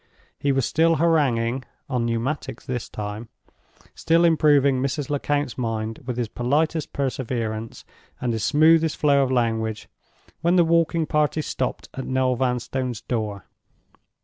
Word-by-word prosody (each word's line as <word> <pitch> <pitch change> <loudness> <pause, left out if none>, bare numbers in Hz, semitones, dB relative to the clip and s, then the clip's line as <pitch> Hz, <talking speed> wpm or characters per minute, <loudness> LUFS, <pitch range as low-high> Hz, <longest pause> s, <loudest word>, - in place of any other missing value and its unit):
He 140 - +1
was 135 -3 +1
still 165 +1 +3
haranguing 135 -7 +1 0.2
(on 125 -4 -1
Pneumatics 120 +6 -3
this 125 -2 -4
time), 105 +2 -6 0.6
still 165 +1 +2
improving 145 -5 +4
Mrs. 140 +2 -2
Lecount's 145 -2 -1
mind 115 -2 -3
with 125 -2 -3
his 120 -2 -1
politest 150 +7 0
perseverance 115 -5 -3 0.3
and 125 -2 -1
his 110 -2 -2
smoothest 160 +1 +4
flow 140 -2 +3
of 130 -1 0
language—when 115 +8 -2
the 175 -2 +5
walking 165 0 +2
party 150 0 +1
stopped 130 - -3
at 135 - -6
Noel 130 -1 +1
Vanstone's 125 -1 -2
door. 105 -4 -3
130 Hz, 130 wpm, -23 LUFS, 115-150 Hz, 0.6 s, the